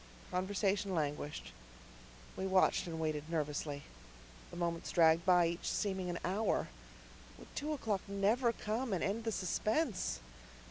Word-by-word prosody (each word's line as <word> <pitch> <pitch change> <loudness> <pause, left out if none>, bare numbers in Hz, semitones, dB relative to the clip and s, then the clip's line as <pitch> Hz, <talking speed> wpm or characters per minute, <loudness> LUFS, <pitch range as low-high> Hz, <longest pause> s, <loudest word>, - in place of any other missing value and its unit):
Conversation 195 +1 0
languished. 145 - -2 0.8
We 190 - -2
watched 190 0 +3
and 165 -1 -4
waited 155 -1 -2
nervously. 150 -2 -2 0.7
The 175 - -9
moments 170 -1 -2
dragged 165 +1 +5
by, 180 -2 +6
each 170 +1 -2
seeming 190 -3 -1
an 175 - -2
hour. 195 +5 +1 0.7
Would - - -14
two 300 +2 -2
o'clock 220 -9 -1
never 210 +5 +2
come 225 +1 -2
and 180 - 0
end 220 +4 -1
the 225 - +1
suspense? 205 - 0
185 Hz, 135 wpm, -35 LUFS, 165-205 Hz, 0.8 s, by